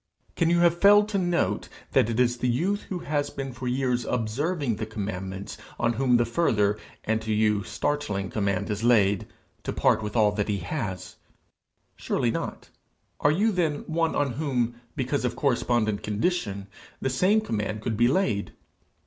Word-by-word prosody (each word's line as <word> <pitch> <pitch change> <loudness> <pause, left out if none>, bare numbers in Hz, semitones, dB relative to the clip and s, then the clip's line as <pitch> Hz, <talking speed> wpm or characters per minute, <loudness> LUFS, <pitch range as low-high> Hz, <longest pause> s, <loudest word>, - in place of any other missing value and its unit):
Can 165 -2 +2
you 170 0 +3
have 170 0 +3
failed 205 +1 +7
to 200 -2 0
note 175 -2 0 0.2
that 110 - +3
it 115 +1 -1
is 120 -1 +3
the 125 - +1
youth 185 +12 0
who 185 - -2
has 145 -1 0
been 135 -2 -5
for 125 +1 -6
years 125 -1 0
observing 125 - -1
the 110 - -3
commandments 95 -2 -5 0.2
on 120 0 +2
whom 125 0 +3
the 120 - +2
further, 110 -6 +1 0.2
and 110 +1 0
to 110 0 -3
you 105 -1 +2
startling, 105 -3 -2
command 100 0 -1
is 105 +1 -3
laid, 105 -5 +3 0.3
to - - -3
part 110 - +2
with 105 0 -5
all 105 -3 +4
that 105 0 -1
he 100 - +1
has? 95 - -5 0.8
Surely - - 0
not! - - -5 0.5
Are 145 - +3
you 205 +9 +2
then 165 -6 0
one 165 0 0
on 145 -2 +1
whom, 125 -3 -1 0.2
because 130 +2 -1
of 125 - -1
correspondent 120 -6 +1
condition, 105 - -1 0.3
the 135 - -1
same 185 +11 +3
command 105 - -3
could 110 - -1
be 120 +3 +4
laid? 125 - 0
120 Hz, 175 wpm, -26 LUFS, 105-150 Hz, 0.8 s, failed